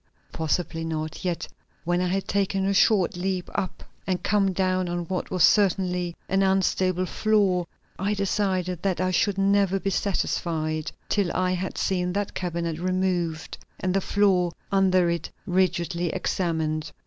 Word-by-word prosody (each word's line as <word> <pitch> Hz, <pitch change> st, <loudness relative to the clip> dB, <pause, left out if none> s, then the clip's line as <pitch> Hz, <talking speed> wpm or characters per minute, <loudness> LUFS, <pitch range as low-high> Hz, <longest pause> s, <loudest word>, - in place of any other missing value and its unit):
Possibly 165 Hz, +1 st, -1 dB
not; 155 Hz, -1 st, -4 dB
yet 175 Hz, -2 st, -2 dB, 0.4 s
when 175 Hz, +1 st, +1 dB
I 180 Hz, -, +1 dB
had 195 Hz, +2 st, -1 dB
taken 195 Hz, -1 st, 0 dB
a 200 Hz, -, +2 dB
short 195 Hz, -2 st, +3 dB
leap 185 Hz, 0 st, -2 dB
up 185 Hz, -, -3 dB, 0.2 s
and 185 Hz, -2 st, -1 dB
come 200 Hz, -2 st, +2 dB
down 185 Hz, -1 st, 0 dB
on 175 Hz, 0 st, -2 dB
what 185 Hz, +2 st, -3 dB
was 185 Hz, -3 st, +1 dB
certainly 180 Hz, -3 st, +3 dB
an 195 Hz, 0 st, +2 dB
unstable 185 Hz, -1 st, +2 dB
floor, 195 Hz, -4 st, +1 dB, 0.3 s
I 200 Hz, +3 st, 0 dB
decided 185 Hz, -3 st, -1 dB
that 190 Hz, -2 st, 0 dB
I 185 Hz, 0 st, +1 dB
should 200 Hz, +2 st, +1 dB
never 195 Hz, -1 st, +3 dB
be 195 Hz, -, -1 dB
satisfied 160 Hz, -5 st, -1 dB, 0.2 s
till 200 Hz, -5 st, +1 dB
I 185 Hz, 0 st, +1 dB
had 185 Hz, +1 st, -3 dB
seen 180 Hz, -1 st, 0 dB
that 200 Hz, 0 st, -2 dB
cabinet 170 Hz, -2 st, -3 dB
removed 180 Hz, -2 st, -1 dB, 0.2 s
and 185 Hz, -1 st, 0 dB
the 195 Hz, -, +2 dB
floor 185 Hz, -4 st, +2 dB, 0.2 s
under 185 Hz, -2 st, +4 dB
it 170 Hz, 0 st, -2 dB, 0.2 s
rigidly 180 Hz, -2 st, +1 dB
examined. 160 Hz, -4 st, -1 dB
185 Hz, 150 wpm, -25 LUFS, 175-195 Hz, 0.4 s, under